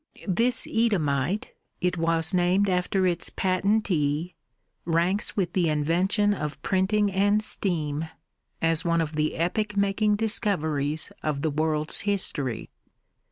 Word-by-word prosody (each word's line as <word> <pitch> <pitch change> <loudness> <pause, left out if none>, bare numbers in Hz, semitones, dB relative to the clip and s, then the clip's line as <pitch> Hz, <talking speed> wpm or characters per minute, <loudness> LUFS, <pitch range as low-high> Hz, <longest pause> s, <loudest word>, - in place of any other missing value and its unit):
This 230 +6 +2
Eadhamite 180 - 0 0.3
it 180 0 0
was 165 0 +1
named 185 +2 +2
after 185 +1 +1
its 175 -2 +1
patentee 185 -5 0 0.5
ranks 175 +6 0
with 180 -3 0
the 175 -4 +2
invention 180 +8 +1
of 150 -7 -5
printing 200 +2 +1
and 205 +2 +2
steam 160 -7 -2 0.5
as 165 -1 +3
one 170 -1 +1
of 160 -1 -2
the 155 0 0
epoch 210 +5 -1
making 200 +1 +2
discoveries 160 -9 0
of 150 -2 -2
the 160 - +1
world's 155 0 0
history. 170 - -1
180 Hz, 120 wpm, -26 LUFS, 155-200 Hz, 0.5 s, as